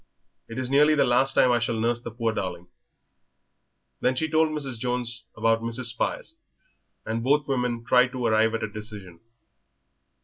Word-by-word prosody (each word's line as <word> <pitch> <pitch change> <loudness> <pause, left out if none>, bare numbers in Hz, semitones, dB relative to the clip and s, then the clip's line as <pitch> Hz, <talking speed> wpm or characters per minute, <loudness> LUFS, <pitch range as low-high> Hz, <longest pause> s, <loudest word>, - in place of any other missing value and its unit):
It 115 - -8
is 130 0 -3
nearly 150 +2 +5
the 145 - +4
last 135 +2 +2
time 125 - +5
I 120 - +3
shall 115 -1 -1
nurse 120 +1 0
the 120 - -6
poor 115 0 -2
darling." 95 -4 -4 1.3
Then 130 - +1
she 160 +5 0
told 160 0 +2
Mrs. 140 -6 -5
Jones 120 -1 -1
about 115 +1 +2
Mrs. 115 +2 -3
Spires, 120 - -3 0.7
and 115 +1 -2
both 145 +4 +2
women 125 -3 -1
tried 125 0 +4
to 125 -2 -3
arrive 110 0 +2
at 115 - -3
a - - -1
decision. 105 -5 -9
120 Hz, 170 wpm, -25 LUFS, 115-130 Hz, 1.3 s, nearly